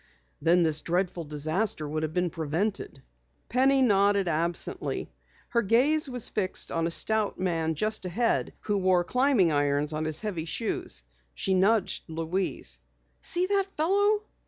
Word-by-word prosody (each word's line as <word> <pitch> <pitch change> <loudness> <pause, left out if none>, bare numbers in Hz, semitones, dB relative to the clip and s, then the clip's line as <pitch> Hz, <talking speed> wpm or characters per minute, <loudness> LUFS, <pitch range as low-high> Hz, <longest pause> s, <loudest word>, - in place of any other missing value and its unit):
Then 170 +3 +4
this 155 -2 +2
dreadful 175 0 -2
disaster 155 +3 -1
would 155 +1 -3
have 155 -1 -2
been 180 0 -1
prevented." 160 -2 -3 0.5
Penny 265 +2 +3
nodded 200 -3 +3
absently. 170 +1 0 0.4
Her 235 - +1
gaze 270 +8 +2
was 250 -3 +2
fixed 190 -3 -1
upon 165 0 0
a - - -2
stout 215 +4 +2
man 165 -3 -1
just 215 +4 -2
ahead 225 +7 0
who 205 -2 -1
wore 185 -2 +2
climbing 250 - +2
irons 145 +1 0
on 155 +1 -2
his 155 -1 +1
heavy 190 -7 -4
shoes. 170 - -2 0.3
She 190 - 0
nudged 195 +2 +2
Louise. 160 - -2 0.4
"See 355 +1 +1
that 395 0 +1
fellow?" 405 +6 +2
185 Hz, 145 wpm, -27 LUFS, 160-225 Hz, 0.5 s, Then